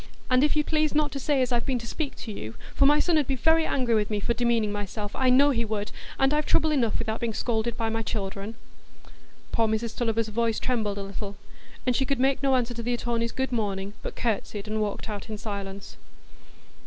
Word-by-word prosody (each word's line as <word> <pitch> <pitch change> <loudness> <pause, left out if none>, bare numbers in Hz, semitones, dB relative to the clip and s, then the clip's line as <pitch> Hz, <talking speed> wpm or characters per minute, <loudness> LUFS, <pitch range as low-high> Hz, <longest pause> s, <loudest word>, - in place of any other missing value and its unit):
"And 255 +1 +5
if 300 - +3
you'd 300 -1 +2
please 310 -1 +1
not 300 -1 +2
to 275 - -4
say 275 -1 +2
as 250 - -2
I've 240 +1 +1
been 260 -2 +2
to 235 - -6
speak 285 +4 -3
to 225 - -7
you, 110 - -6 0.2
for 275 - +5
my 295 +1 +6
son 330 -2 +3
'ud 290 - 0
be 270 - +1
very 320 +5 +3
angry 250 -4 +1
with 210 -2 +2
me 210 -1 0
for 235 +4 0
demeaning 235 -2 +1
myself, 205 0 -4
I 260 -1 +3
know 280 +3 +6
he 235 -3 +1
would, 210 -2 -3 0.3
and 270 +2 +3
I've 300 0 +1
trouble 315 0 +3
enough 240 -7 +2
without 220 -1 -2
being 230 -2 -2
scolded 230 0 -1
by 225 -1 0
my 225 0 -1
children." 205 0 -4 1.0
Poor 225 -1 +2
Mrs 220 +1 -1
Tulliver's 225 -2 0
voice 225 +1 +1
trembled 220 -5 -1
a 200 - -3
little, 200 +1 -6 0.5
and 250 -1 +2
she 270 - +2
could 275 -1 0
make 270 0 +2
no 270 -1 +3
answer 245 -1 +1
to 235 - -5
the 240 +1 0
attorney's 235 -1 -1
"good 265 -1 -2
morning," 200 -4 -2
but - - -6
curtsied 215 -2 -2
and 215 0 -1
walked 210 +1 -2
out 210 0 -6
in 215 - -4
silence. 200 -2 -6
230 Hz, 230 wpm, -27 LUFS, 215-265 Hz, 1.0 s, my